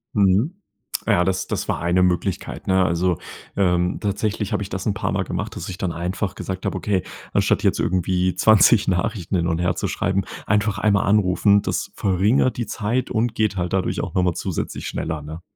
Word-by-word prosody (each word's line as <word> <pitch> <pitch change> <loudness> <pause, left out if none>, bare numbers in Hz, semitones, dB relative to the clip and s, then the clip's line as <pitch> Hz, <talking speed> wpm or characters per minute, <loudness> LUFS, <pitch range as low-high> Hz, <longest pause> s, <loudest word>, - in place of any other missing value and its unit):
Mhm. 100 - +3 0.5
Ja, 90 - +4
das 95 0 0
das - - -3
war - - 0
eine 85 +2 +2
Möglichkeit, 90 +1 -1
ne? 95 0 +4
Also, 85 0 +1 0.4
ähm, 90 -2 +1
tatsächlich 105 0 -2
habe - - 0
ich 100 - -8
das 95 +2 -4
'n 100 - +2
paarmal - - -1
gemacht, - - -4
dass - - -6
ich 90 - -6
dann 90 -2 -2
einfach 90 +3 -3
gesagt 95 0 -5
habe: - - -1
„Okay, 95 -4 0 0.3
anstatt - - +2
jetzt - - +2
irgendwie 90 0 +1
20 110 +2 +5
Nachrichten 95 0 -1
hin 85 -1 +1
und 85 -1 0
her 90 0 +1
zu - - -2
schreiben, 95 -1 0 0.2
einfach 105 -1 +1
einmal 100 -2 +2
anrufen. 100 0 +4
Das - - -3
verringert 100 +7 +2
die 120 - -1
Zeit 115 +5 -2
und 115 +1 0
geht 110 -2 +1
halt 90 +1 -2
dadurch 95 - 0
auch - - -5
noch 90 - +3
mal 90 - +2
zusätzlich 90 0 -4
schneller, 80 -1 -3
ne? 80 +3 -8
95 Hz, 195 wpm, -22 LUFS, 90-105 Hz, 0.5 s, 20